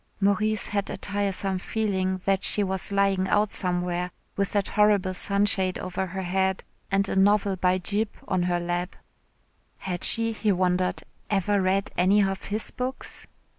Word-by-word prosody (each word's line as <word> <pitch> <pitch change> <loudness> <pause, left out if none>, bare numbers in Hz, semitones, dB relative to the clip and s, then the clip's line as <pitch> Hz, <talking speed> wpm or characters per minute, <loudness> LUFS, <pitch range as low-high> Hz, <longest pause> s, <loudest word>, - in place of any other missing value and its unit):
Maurice 210 +1 +1
had 200 -1 -1
a - - -4
tiresome 195 -1 0
feeling 190 -3 -1
that 195 -1 +1
she 210 - +4
was 190 0 -2
lying 195 -1 +2
out 210 +1 +2
somewhere 180 -1 -1 0.3
with 200 0 -1
that 200 -2 0
horrible 205 -3 +3
sunshade 200 -1 +1
over 185 +1 -3
her 190 +1 -5
head 190 +1 0 0.3
and 195 0 +1
a - - -2
novel 200 0 +3
by 185 0 +2
Gyp 205 +4 0 0.2
on 185 - +1
her 175 0 +1
lap. 175 +1 -3 0.8
Had 180 -2 -5
she, 230 0 +1
he 215 -1 0
wondered, 180 -1 0 0.3
ever 200 0 +1
read 190 +1 +1
any 195 +3 +4
of 195 0 -2
his 210 +2 -3
books? 255 +1 -5
195 Hz, 160 wpm, -26 LUFS, 185-205 Hz, 0.8 s, she